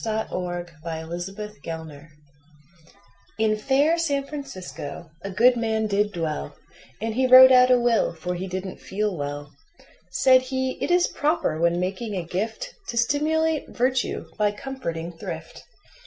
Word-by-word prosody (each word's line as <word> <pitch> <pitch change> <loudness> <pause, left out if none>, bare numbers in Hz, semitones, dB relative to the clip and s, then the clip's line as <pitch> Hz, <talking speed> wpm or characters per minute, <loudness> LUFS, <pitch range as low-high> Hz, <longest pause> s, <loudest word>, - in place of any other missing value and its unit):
Ambrose 180 -6 -3
Bierce 165 +2 -4
The 210 +2 -7
Legatee 160 -2 -7 1.3
IN 220 -1 +2
fair 280 +9 +2
San 285 -4 0
Francisco 190 - -7
a 195 - -5
good 235 +6 +4
man 220 -2 0
did 205 0 +1
dwell, 160 - -4 0.4
And 225 +1 -2
he 260 +3 +2
wrote 260 +1 +10
out 250 0 +7
a 250 -1 +5
will, 235 -2 +2
for 180 +3 -4
he 180 +2 -4
didn't 185 0 -5
feel 205 0 -2
well. 145 -1 -5 0.6
Said 255 +8 +5
he: 260 0 -2
"It - - -1
is 355 0 +4
proper, 300 - 0
when 170 +1 +2
making 200 +4 -3
a 180 -3 -3
gift, 220 - -4
To 235 - -4
stimulate 310 +5 +1
virtue 255 +1 0
by 210 -1 +2
comforting 205 -10 -5
thrift." - - -7
215 Hz, 145 wpm, -24 LUFS, 175-260 Hz, 1.3 s, wrote